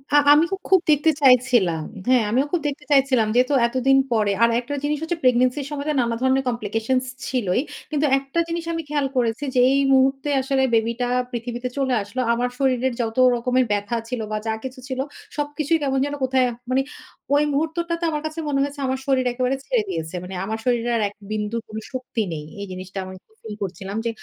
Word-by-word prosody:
আ - - +8 0.2
আমি 305 +3 +5
খু - - +1
খুব 380 -2 +5
দেখতে 300 +2 +4
চাইছিলাম। 245 - +4 0.2
হ্যাঁ, 255 -2 +4
আমিও 255 +6 +2
খুব 350 - 0
দেখতে 290 +1 -5
চাইছিলাম 265 -5 +4
যেহেতু 255 +3 +3
এতদিন 260 +2 +3
পরে। 215 -3 +2
আর 235 - +6
একটা 250 +4 -6
জিনিস 295 +1 0
হচ্ছে, 335 +1 -2
প্রেগনেন্সির 255 +2 +2
সময় 290 -1 -4
তো - - +2
নানা 235 -1 0
ধরনের 260 +1 +2
কমপ্লিকেশনস 235 +2 -1 0.2
ছিলই। 235 -6 0 0.3
কিন্তু 300 0 +1
একটা 275 +4 -3
জিনিস 335 0 -3
আমি 330 - -2
খেয়াল 290 -2 0
করেছি 235 +2 0
যেই 255 +2 +5 0.2
মুহূর্তে 270 +2 +2
আসলে 265 0 0
বেবি 225 +1 +2
টা 245 - +1 0.2
পৃথিবীতে 240 +1 -4
চলে 265 -2 +1
আসলো, 215 +6 -4
আমার 245 +1 0
শরীরের 260 -1 +1
যত 225 +1 -3 0.2
রকমের 250 +2 +1
ব্যাথা 205 +3 -1
ছিল, 250 -1 -3
বা 215 - 0
যা 220 - +1
কিছু 260 0 -7
ছিল, 260 -1 -4 0.4
সবকিছুই 295 +2 0
কেমন 270 -1 +1
যেন 290 0 -3
কোথায়, 260 -1 +3 0.2
মানে 260 +1 +3 0.5
ওই 290 - +4
মুহূর্তটা 325 +4 -1
তো - - -4
আমার 300 -1 -2
কাছে 310 +1 -4
মনে 275 -1 +1
হয়েছে, 285 +1 -5
আমার 260 0 -1
শরীর 265 -2 +2
একেবারে 255 +2 0
ছেড়ে - - +1
দিয়েছে। 160 - -4
মানে 185 +1 -7
আমার 220 +2 -3
শরীরে 240 -1 +1
আর - - 0
এক 200 - -9 0.2
বিন্দুর 215 +2 -2
কোন 215 - -8 0.2
শক্তি 255 -3 -3
নেই। 150 -2 -5 0.2
এই - - -4
জিনিসটা 185 +1 -6
আমি 185 - -8
খুব 440 - -31
ফিল 215 -2 -6
করছিলাম 195 +2 -5
যে, - - +1
255 Hz, 205 wpm, -22 LUFS, 230-280 Hz, 0.5 s, আ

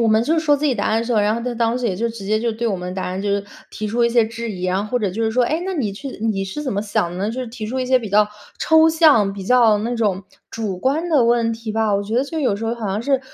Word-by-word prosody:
我 230 - +3
们 220 +1 +4
就 320 +5 +2
说 300 -2 +3
自 300 - -4
己 275 - +2
答 205 - -1
案 220 - +1
的 230 - -2
时 240 - -2
候， 215 - +3
然 210 +1 +2
后 235 - -3
他 250 0 -3
当 230 0 +1
时 250 - -5
也 195 - 0
就 230 +5 -1
直 225 -3 -8
接 215 +2 +1
就 235 0 0
对 230 +2 -3
我 215 - 0
们 180 0 -6
答 190 - -3
案， 185 +1 -3
就 205 - -2
是 200 0 0 0.3
提 215 - -5
出 230 +3 0
一 235 - +4
些 235 -1 +3
质 230 +1 -5
疑 185 -3 -5
啊， 185 0 +1
然 200 +2 -1
后 - - -13
或 250 - +1
者 205 -5 -1
就 220 +5 -3
是 220 - +1
说： 245 +2 +2
“诶， 315 +7 -1
那 380 - -2
你 230 - -1
去 275 +8 -7
你 210 -4 0
是 195 +11 -5
怎 265 - -2
么 200 - -1
想 205 -4 -1
的 175 - -7
呢？” 200 - -1
就 255 +3 -4
是 250 - -6
提 225 -2 -6
出 255 +4 -3
一 255 - -1
些 255 0 +3
比 225 -3 -6
较 210 +1 +4 0.3
抽 320 0 +5
象、 310 - +4
比 195 - -7
较 235 -1 +5
那 235 +3 -2
种 205 -5 0 0.3
主 205 -5 -4
观 305 - 0
的 280 -7 +4
问 235 -1 +2
题 225 -1 -6
吧。 220 -1 +1
我 200 - 0
觉 210 +2 -5
得 260 - +2
就 320 +3 -5
有 225 -8 +1
时 225 - -5
候， 230 +1 -1
好 230 -3 -5
像 200 +3 -2
是 270 +1 +1
225 Hz, 375 characters per minute, -20 LUFS, 205-250 Hz, 0.3 s, 抽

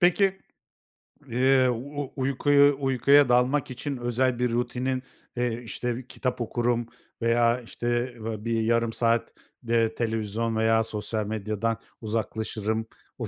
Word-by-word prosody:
Peki, 190 +2 +4 0.9
eee, 130 +1 +3
u 140 +3 -4
uykuyu 140 +1 +4
uykuya 140 +1 +4
dalmak 125 +3 +2
için 140 +2 -4
özel 120 +1 0
bir 125 -1 +1
rutinin, 125 +2 -1 0.3
eee, 120 -1 -1
işte, 120 +2 -4
kitap 125 -1 -3
okurum 120 0 0 0.4
veya, 115 +1 +3
işte, 120 +1 -2
va 110 -1 -5
bir 115 -1 +1
yarım 115 0 +1
saat, 115 0 +1 0.3
eee, 115 -1 +2
televizyon 115 0 -1
veya 115 0 +3
sosyal 110 0 -3
medyadan 110 +1 -2 0.2
uzaklaşırım. 110 0 -2 0.3
O - - -4
120 Hz, 120 wpm, -26 LUFS, 115-130 Hz, 0.9 s, Peki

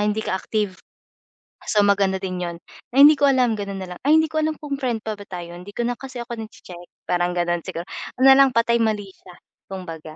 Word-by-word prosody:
hindi 210 +1 0
ka - - -2
active, 205 -4 -2 0.9
so, 210 -1 +3
maganda 195 -1 +2
din 185 -1 -3
'yun, 175 -1 -4 0.4
ay 275 - +8
hindi 300 +1 +8
ko 285 - +5
alam, 250 -5 +2
gano'n 200 -1 -5
na 185 - -8
lang - - -14
ay 305 - +6
hindi 315 0 +3
ko 315 - 0
alam 310 0 0
kung 285 -2 -5
friend 240 -5 -2
pa 215 -2 -5
ba 205 - -10
tayo 175 -2 -7
hindi 205 +3 -12
ko 240 - -1
na 240 0 -2
kasi 260 -3 -7
ako 235 -1 -7
nagche-check, 180 -5 -10 0.2
parang 175 0 +1
gano'n 175 0 0
siguro, 170 - -5 0.4
ano 270 - +8
lang 270 0 +6
patay 235 0 +3
malisya 205 -5 -3 0.3
kumbaga, 165 -5 -8
210 Hz, 220 wpm, -22 LUFS, 185-250 Hz, 0.9 s, ay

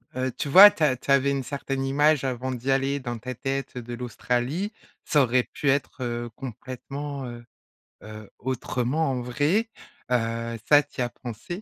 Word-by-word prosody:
heu, 130 0 -1
tu 130 - -4
vois, 195 +8 +11
tu 160 - -3
as 140 -4 +4
tu 130 - -4
avais 140 0 +4
une 135 -1 -1
certaine 135 0 -3
image 145 +1 +3
avant 130 0 -2
d'y 125 +2 -2
aller 135 +1 +1
dans 120 -2 -4
ta 125 +2 -6
tête 135 +1 -3
de 120 0 -6
l'Australie, 125 - -2 0.3
ça 150 - +3
aurait 125 0 +2
pu 145 - 0
être, 135 0 0
heu, 120 0 -3
complètement, 135 +3 -6
heu, 120 0 -9 0.6
heu, 110 -1 -10
autrement, 130 +3 -1
en 125 -1 -2
vrai. 145 - 0 0.4
Heu, 115 -1 -1
ça 145 0 +7
tu - - -15
y 125 - +2
as 120 - -2
pensé? 115 -3 -9
130 Hz, 180 wpm, -25 LUFS, 120-140 Hz, 0.6 s, vois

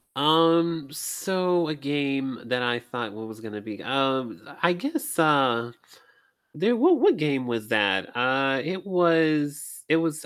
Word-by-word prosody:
Um, 165 +1 +3
so 180 +1 -1
a 155 - -3
game 140 -3 -2
that 125 +1 -1
I 120 0 0
thought 120 -3 -7
was 110 0 -10
gonna 105 -2 -8
be, 100 -2 -9
um 130 -2 -1 0.2
I 170 - +4
guess, 285 - -4
uh, 130 -6 +3 0.8
there 220 +10 +2
What 335 +7 +4
what 390 -1 +4
game 140 -4 -1
was 115 -3 -4
that? 100 -3 +1
Uh, 130 +1 +1
it 185 +3 -5
was 160 -6 +1
it 160 - +4
was, 160 -2 -2
140 Hz, 145 wpm, -25 LUFS, 120-165 Hz, 0.8 s, I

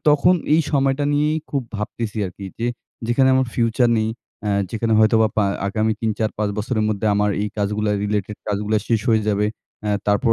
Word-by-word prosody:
তখন 150 +5 +5 0.2
এই 165 - +5
সময়টা 135 0 +2
নিয়েই 150 +2 +2
খুব 140 -2 0
ভাবতেসি 105 +1 -4
আর 90 - -6
কী 100 - -8
যে 115 - -1 0.4
যেখানে 130 +3 +3
আমার 130 0 +2
ফিউচার 120 0 +2
নেই, 110 - 0 0.4
অ্যা 105 - 0 0.2
যেখানে 115 0 -1
হয়তোবা 110 0 +4
পা 105 - +3 0.2
আগামী 110 +2 +1
৩, 110 -1 +1
৪, 110 -1 +1
৫ 105 -1 0
বছরের 110 0 0
মধ্যে 110 0 -1
আমার 105 0 +2
এই 105 - -1
কাজগুলা 105 +1 0
রিলেটেড 105 0 -2
কাজগুলা 105 +1 0
শেষ 115 -2 +2
হয়ে 110 -2 +4
যাবে। 105 0 +2 0.4
অ্যা 105 - -1 0.2
তারপর 105 +3 +3
110 Hz, 190 wpm, -21 LUFS, 105-120 Hz, 0.4 s, তখন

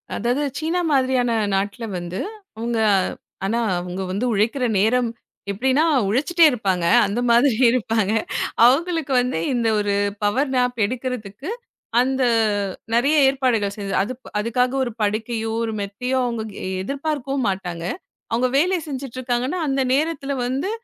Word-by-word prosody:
அதாது 245 +6 0 0.2
சீனா 325 +3 -1
மாரியான 255 -3 +2 0.2
நாட்டுல 200 +4 -2
வந்து, 175 +2 -5 0.4
அவுங்க 230 0 -2 0.7
ஆனா, 230 +4 0 0.2
அவுங்க 180 +1 -5
வந்து 205 +6 -1
உழைக்கிற 235 +6 +1
நேரம் 240 +4 +2 0.4
எப்படின்னா 260 +9 +2 0.2
உழைச்சுட்டே 305 - +3
இருப்பாங்க. 190 -8 -1 0.2
அந்த 200 +4 -2
மாதிரி 235 +1 +4
இருப்பாங்க. 225 -4 +1 0.5
அவுங்களுக்கு 320 +2 +2
வந்து 250 -9 -2 0.2
இந்த 235 -2 +1
ஒரு 205 -1 0 0.3
பவர் 260 +7 +1
நேப் 250 -1 +1
எடுக்குறதுக்கு, 250 - -5 0.5
அந்த 265 +1 0 0.7
நெறைய 275 +6 +3
ஏற்பாடுகள் 240 -7 0
செய்து, 200 -1 -4
அது 235 +6 -4 0.3
அதுக்காக 245 +4 0
ஒரு 240 - -3
படுக்கையோ, 220 +2 -1
ஒரு 225 -1 -2
மெத்தயோ 250 +7 -2
அவுங்க 235 -2 -2 0.4
எதிர்பார்க்கவும் 275 0 -2
மாட்டாங்க. 180 -3 -4 0.5
அவுங்க 240 +3 +2
வேலை 360 +5 +3
செஞ்சிட்டு 265 -3 -6
இருக்காங்கனா, 255 +7 -1
அந்த 270 -1 +1
நேரத்துல 290 -1 0
வந்து, 265 +9 -1
245 Hz, 125 wpm, -22 LUFS, 210-270 Hz, 0.7 s, மாதிரி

